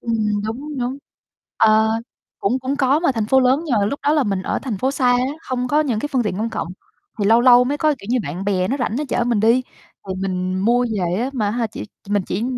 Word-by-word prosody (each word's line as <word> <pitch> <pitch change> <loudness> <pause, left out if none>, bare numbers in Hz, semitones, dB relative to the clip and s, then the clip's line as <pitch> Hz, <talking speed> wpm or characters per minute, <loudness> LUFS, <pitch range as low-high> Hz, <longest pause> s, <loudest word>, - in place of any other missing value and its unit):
Ừm, 215 -3 -1
đúng, 270 +7 -5
đúng. 250 +2 -2 0.6
Ờ, 220 0 +4 0.5
cũng 230 +6 0
cũng 260 +2 -3
có, 275 +1 +3
mà 335 -5 +2
thành 225 -3 -2
phố 265 +4 +4
lớn 260 +4 +3
nhưng 275 - +1
mà 200 - +2
lúc 280 +7 -3
đó 290 - +2
là 300 -2 +3
mình 195 -3 -1
ở - - -1
thành 235 -7 -4
phố 260 +6 0
xa 265 -2 0
á, 245 - +3 0.2
không 250 -1 -3
có 295 +4 +3
những 260 -8 0
cái 295 - -3
phương 255 -3 +2
tiện 210 -4 -2
công 225 +3 -2
cộng, 165 - -4 0.5
thì 205 - 0
lâu 225 +3 +5
lâu 245 0 +7
mới 285 +3 -2
có, 305 0 +2
kiểu - - -12
như, 255 - +2
bạn 185 0 -5
bè 190 -2 0
nó 270 - 0
rảnh 240 -4 -2
nó 300 - -1
chở 245 - 0
mình 235 -3 +1
đi. 230 +4 +4 0.5
Thì 190 - -2
mình 185 -1 -2
mua 240 +5 +3
về 180 -1 -1
á, 255 +3 -1
mà 215 -6 -1
ha, 235 +1 -1
chỉ 220 - -8 0.3
mình 205 -1 +1
chỉ 200 - -2
235 Hz, 265 wpm, -20 LUFS, 205-260 Hz, 0.6 s, lâu